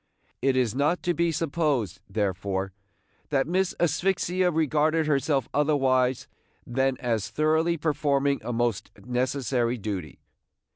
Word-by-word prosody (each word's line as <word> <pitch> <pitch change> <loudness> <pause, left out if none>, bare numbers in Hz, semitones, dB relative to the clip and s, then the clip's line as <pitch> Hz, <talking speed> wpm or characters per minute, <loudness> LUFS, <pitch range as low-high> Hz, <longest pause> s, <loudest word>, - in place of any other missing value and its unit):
It 135 -1 +2
is 120 -4 +1
not 150 +7 +1
to 175 -1 +1
be 170 +1 +1
supposed, 150 - -1
therefore, 95 -2 -2 0.6
that 135 -2 +2
Miss 185 +3 0
Asphyxia 180 +2 +1
regarded 155 0 +1
herself 140 -3 +1
otherwise 135 -4 +2 0.4
than 130 +1 0
as 115 -4 -1
thoroughly 160 +2 +1
performing 145 -2 +1
a - - -3
most 120 -3 -1
necessary 125 +1 -1
duty. 95 - -5
140 Hz, 115 wpm, -26 LUFS, 120-160 Hz, 0.6 s, It